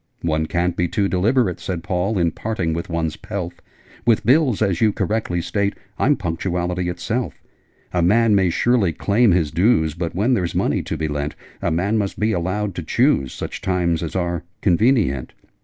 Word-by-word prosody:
'One 80 -1 0
can't 85 +1 0
be 90 - +1
too 100 +2 0
deliberate,' 95 +1 +1
Said 90 -3 -4
Paul, 95 +2 -1
'in 85 -2 +2
parting 95 -7 -2
with 85 +2 -4
one's 80 -2 -1
pelf. 90 -5 -6 0.4
With 115 -3 +2
bills, 130 -2 +4
as 95 -5 +1
you 110 -2 +4
correctly 105 -5 -1
state, 100 +2 -1 0.2
I'm 145 +2 +4
punctuality 90 -1 -2
itself: 110 +8 -3 0.6
A 90 - +2
man 110 +5 +4
may 95 -3 +3
surely 100 -1 +2
claim 110 +7 +2
his 85 -4 +2
dues: 85 -2 +2
But, 85 +1 -4
when 110 +8 +2
there's 90 -8 -1
money - - +1
to - - -4
be 80 - -1
lent, 75 0 -3 0.3
A - - 0
man 95 +7 +1
must 100 -2 -3
be 110 +1 +2
allowed 95 +2 -1
to 85 - -4
choose 120 - +2
Such - - -6
times 90 -3 0
as 85 +1 -5
are 85 -3 -1 0.2
convenient!' 95 - +2
90 Hz, 180 wpm, -21 LUFS, 85-110 Hz, 0.6 s, bills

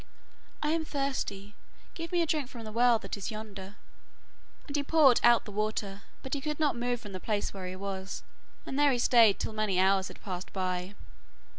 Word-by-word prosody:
'I 300 - +1
am 325 0 +1
thirsty, 265 -9 -3 0.4
give 335 +1 -6
me 350 -1 +3
a - - 0
drink 300 -4 0
from 235 -3 -9
the 215 - -7
well 240 +1 +4
that 220 - -5
is 195 - -4
yonder.' 205 -3 -8 0.9
And 285 - -5
he 290 - +2
poured 285 -4 +5
out 240 -1 +6
the 210 - -8
water, 205 -1 -2 0.2
but 265 - -5
he 285 - -1
could 300 +1 -3
not 295 -6 +2
move 245 0 -1
from 205 -3 -10
the 185 - -5
place 210 +1 -2
where 190 -2 -6
he 185 - -5
was; 190 0 -5 0.4
and 270 - -3
there 290 -1 +5
he 250 - +1
stayed 230 -4 +5
till - - -3
many 215 -4 0
hours 190 0 +3
had - - -11
passed 185 -2 -6
by. 185 0 -2
220 Hz, 205 wpm, -30 LUFS, 195-275 Hz, 0.9 s, out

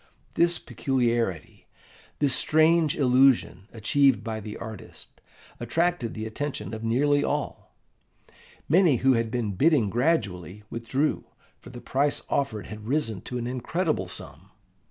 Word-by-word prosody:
This 170 0 +2
peculiarity, 120 - -2 0.5
this 145 -3 +2
strange 160 +1 +3
illusion 130 -7 +3
achieved 130 +4 +2
by 110 -1 -4
the 105 0 -8
artist, 110 -3 -10 0.4
attracted 165 +1 -1
the 110 0 -5
attention 110 -2 -5
of 110 0 -6
nearly 145 +5 +2
all. 145 0 -4 0.9
Many 170 -2 +4
who 135 - +6
had 115 -1 0
been 115 -3 -2
bidding 125 - +2
gradually 105 - -1
withdrew, 130 +6 -1 0.3
for - - -13
the 120 -1 -10
price 140 +2 0
offered 115 -7 -1
had 105 0 -9
risen 115 -8 -1
to 125 - -5
an 120 - -4
incredible 130 - -2
sum. 90 +1 -7
125 Hz, 130 wpm, -26 LUFS, 110-145 Hz, 0.9 s, who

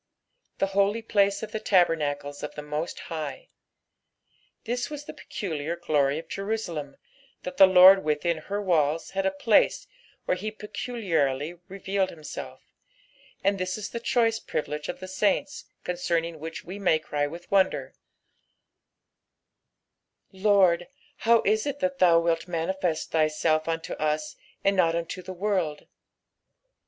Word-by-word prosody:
" - - -48
The - - +2
holy 200 +3 +2
place 200 -2 +2
qf 220 -1 -6
the 220 - -3
tdltemaeUa 150 -7 +1
of 150 - -6
the 150 - -6
Moit 150 +3 -4
High," 165 - -6 1.1
This 245 +1 -2
was 295 -1 -6
tbe - - -9
peculiar 165 -4 -4
glor^ 145 -4 +1
of 160 - -7
Jerusalem, 185 -9 -4 0.5
that 270 0 -6
the 195 - +9
Lord 185 +1 +8
within 155 +2 0
her 200 +6 -4
walls 165 -5 +1
had 195 0 0
a - - +4
place 195 +3 +2 0.4
where - - +1
he 205 +4 -4
peculiarly 175 - -2
revealed 195 0 -1
himself, 155 -3 -8 0.8
and 195 0 +2
this 185 +2 -2
is 215 - -6
the 235 - -4
choice 230 -1 +1
privilege 150 -4 -4
of - - -5
the 185 - -6
saints, 210 +9 0 0.2
concemmg 170 -2 -1
which 160 +2 -7
we 190 +4 -7
may 180 -5 +3
cry 145 -2 -2
with 170 +4 -10
wonder, 195 -1 +2 2.4
"lA>rd, 190 -3 +3 0.3
how 230 0 +4
is 215 +5 +1
it 285 -1 -2
that 275 -1 -1
thou 170 -2 +6
wilt 165 0 0
manifest 170 -1 -2
thyself 155 0 +1
unto 165 0 -2
us, 155 0 -2 0.3
and 195 0 +3
not 165 -3 +3
unto 170 +2 -4
the 185 +1 -8
world?" 185 -5 -1
180 Hz, 145 wpm, -26 LUFS, 160-200 Hz, 2.4 s, the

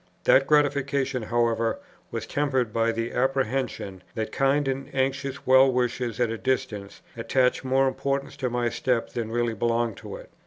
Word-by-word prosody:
That 135 +1 +5
gratification, 140 -3 +2
however, 115 0 0 0.3
was - - -4
tempered 130 -6 0
by 115 0 +2
the 115 0 -3
apprehension, 130 -7 -1
that 110 -1 -3
kind 135 +1 +2
and 135 0 -3
anxious 135 0 -1
well 130 +1 +6
wishers 125 -2 -1
at 120 -2 +1
a 115 - -4
distance 110 -7 -3
attach 125 +3 +1
more 135 +1 +2
importance 140 +1 -2
to 130 -2 -1
my 120 0 0
step 120 0 -1
than 115 -2 -3
really 120 0 0
belongs 115 0 0
to - - -8
it. - - -12
125 Hz, 160 wpm, -26 LUFS, 115-135 Hz, 0.3 s, well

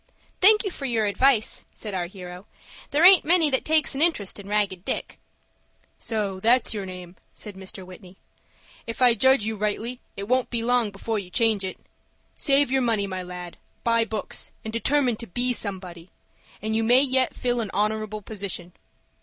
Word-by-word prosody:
"Thank 425 +3 +7
you 395 - -3
for 280 - -7
your 230 -4 0
advice," 220 +3 +2
said 210 -2 -7
our 180 -2 -2
hero. 180 0 -10 0.4
"There 300 +4 +3
aint 375 -1 +8
many 330 -2 +4
that 265 - +2
takes 310 -1 +3
an 275 - -2
interest 265 - +1
in 200 - -10
Ragged 200 -3 -1
Dick." - - -3 0.8
"So 205 -4 -2
that's 235 +5 +3
your 200 -3 -5
name," 180 -1 -10 0.2
said 210 - -6
Mr. 190 0 -7
Whitney. 185 0 -14 0.7
"If 230 - -6
I 250 -2 +6
judge 260 0 +4
you 220 0 -2
rightly, 215 +4 -3 0.2
it 200 0 -5
won't 255 +1 +1
be 235 -2 -2
long 245 -2 +3
before 210 +2 -3
you 185 -3 -9
change 220 0 +1
it. 190 - -5 0.6
Save 280 -2 +3
your 265 0 +2
money, 225 -4 +1
my 185 -1 -5
lad, 180 -1 -8 0.3
buy 230 -1 +3
books, 220 -1 -4
and 220 - -6
determine 250 0 +1
to 230 - -7
be 245 +7 -1
somebody, 185 -5 -5 0.5
and 220 0 -1
you 225 - +1
may 245 +3 +5
yet 260 -2 +1
fill 245 -1 -1
an 215 - -4
honorable 215 0 -2
position." 190 -4 -6
220 Hz, 180 wpm, -24 LUFS, 195-250 Hz, 0.8 s, aint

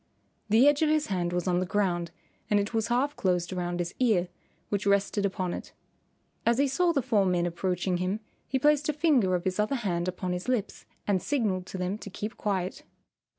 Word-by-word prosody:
The 225 +6 +6
edge 290 +1 +4
of 310 - +3
his 310 -1 +2
hand 175 -2 0
was 180 +1 -1
on 180 -1 +2
the 185 - 0
ground 180 -4 0 0.4
and 205 - +4
it 205 +3 -2
was 225 -1 +1
half 260 +5 +1
closed 180 -1 0
around 175 -1 -2
his 175 0 -3
ear, 210 -8 +2 0.4
which 200 0 -1
rested 200 0 +2
upon 185 -2 -3
it. - - -7 0.7
As 235 0 +3
he 280 +1 +3
saw 340 +6 +2
the 280 -6 0
four 210 -4 +3
men 180 -2 +1
approaching 180 +1 -1
him 185 +4 -1 0.3
he 265 - 0
placed 295 +2 +3
a - - +2
finger 275 - +3
of 175 - -2
his 185 +1 -2
other 215 +6 +1
hand 180 -7 -1
upon 185 0 -2
his 180 +4 -4
lips 240 -5 -2 0.2
and 195 -3 +1
signalled 205 -10 -1
to 190 - -6
them 185 +3 -2
to 205 - -8
keep 210 +3 -5
quiet. 190 -3 -2
200 Hz, 210 wpm, -28 LUFS, 180-240 Hz, 0.7 s, The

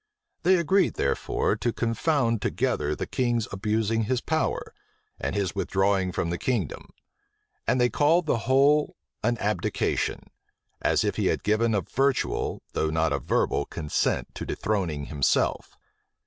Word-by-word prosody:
They 185 +2 +5
agreed, 185 +4 +2
therefore, - - 0
to 120 +2 0
confound 115 0 0
together 75 +1 0
the - - -3
king's 120 -3 0
abusing 110 +3 0
his 125 +3 0
power, 160 +5 -1 0.5
and - - -2
his 100 -2 -1
withdrawing 95 -1 +1
from 85 -1 -2
the 85 - -3
kingdom; 125 -2 -2 0.8
and 130 - +2
they 125 0 +3
called 160 +4 +3
the 115 -5 -1
whole 145 +3 +4 0.3
an 120 +2 +1
abdication; 105 0 -1 0.5
as - - +2
if - - -1
he - - +1
had - - 0
given 110 +2 +2
a 100 - +2
virtual, 135 - 0
though 80 - 0
not 80 +1 +1
a - - 0
verbal, 70 - 0
consent 75 -3 -1
to - - -6
dethroning 90 -9 -2
himself. 70 -3 0
115 Hz, 145 wpm, -26 LUFS, 95-130 Hz, 0.8 s, They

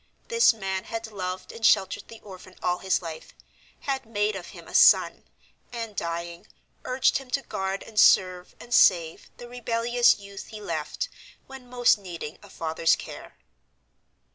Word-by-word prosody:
This 465 0 +5
man 190 -4 -4
had 225 0 -5
loved 185 -2 -5
and 230 - -12
sheltered 195 -3 +2
the 225 -1 -13
orphan 185 -2 -13
all 180 0 0
his 190 -1 0
life, 160 -2 -9 0.5
had 270 -1 -2
made 210 -1 0
of 185 -3 -7
him - - -12
a - - -12
son, - - +5 0.5
and, 230 -3 -6
dying, 170 +2 -5 0.4
urged 255 +1 +2
him 270 -2 -13
to 275 +2 -1
guard 190 -3 -4
and 215 -2 -3
serve 180 -1 +4
and 240 - -8
save 170 -7 +3
the 240 - -10
rebellious 240 0 +2
youth 200 -1 -10
he 215 - -9
left, 165 - -4 0.4
when 265 -2 -12
most 245 -3 +3
needing 175 -4 -8
a 205 - -15
father's 160 -1 +1
care. - - -10
200 Hz, 160 wpm, -26 LUFS, 180-235 Hz, 0.5 s, This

